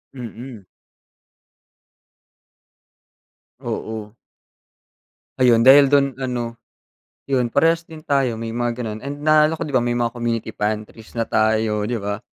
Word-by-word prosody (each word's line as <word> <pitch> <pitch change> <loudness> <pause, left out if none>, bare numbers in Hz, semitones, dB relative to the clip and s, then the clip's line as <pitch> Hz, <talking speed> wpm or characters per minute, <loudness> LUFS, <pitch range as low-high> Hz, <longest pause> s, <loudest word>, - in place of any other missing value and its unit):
Mm. 120 -3 -9 2.9
Oo. 110 -1 -5 1.2
Ayun, 120 -3 +4
dahil 140 +1 +8
dun 140 -1 +3
ano. 120 -2 -4 0.7
Yun 125 -3 0
parehas 165 +6 +2
din 160 -1 -12
tayo 135 -5 +1
may 115 0 -5
mga 120 0 0
gano'n 110 -3 -4
and 140 +2 -6
naaalala 155 +1 +3
ko, - - -3
'di 145 - -7
ba, 125 - +4
may 120 0 -1
mga 120 0 -1
community 120 -1 -3
pantries 110 +1 -4
na 115 - 0
tayo, 110 -1 +1
'di 115 +3 -2
ba? 100 +1 -4
120 Hz, 125 wpm, -21 LUFS, 110-135 Hz, 2.9 s, dahil